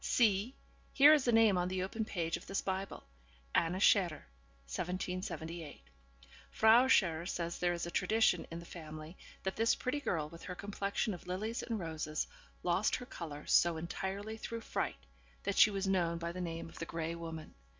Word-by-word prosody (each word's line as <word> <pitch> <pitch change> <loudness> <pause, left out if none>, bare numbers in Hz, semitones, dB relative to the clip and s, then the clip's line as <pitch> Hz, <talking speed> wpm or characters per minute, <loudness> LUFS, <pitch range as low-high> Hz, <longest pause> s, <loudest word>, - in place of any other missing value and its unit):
'See! 220 +1 +2 0.4
here 290 +2 +8
is 295 -4 +3
the 240 - +3
name 225 -5 +5
on 180 - 0
the 185 0 -1
open 220 +4 -2
page 170 -6 -2
of - - -9
this 195 - -1
Bible, 190 0 -3 0.5
"Anna 170 +3 +2
Scherer, 185 -5 +3 0.4
1778." 175 - -4 0.7
Frau 225 +4 +6
Scherer 170 -9 +3
says 170 -2 -3
there 175 0 +2
is 170 - -3
a 170 - -5
tradition 185 -2 +2
in 165 - -6
the 170 - -9
family 155 0 -9 0.3
that 190 - -2
this 225 +1 +3
pretty 270 +4 -2
girl, 165 - -1
with 165 +2 -12
her 180 - -5
complexion 200 +2 -2
of 175 0 -10
lilies 215 +6 -2
and 230 -2 -3
roses, 155 -3 -3 0.4
lost 180 +4 +2
her 250 - -6
colour 155 -10 -7
so 170 -1 +4
entirely 195 +6 -4
through 230 +1 -5
fright, - - -2 0.5
that 200 0 0
she - - +9
was 200 -1 -2
known 175 -3 +1
by 170 0 -3
the 180 +1 -5
name 165 -2 -4
of - - -12
the 165 - -3
Grey 165 0 -3
Woman. 165 -2 -7
180 Hz, 180 wpm, -34 LUFS, 165-210 Hz, 0.7 s, she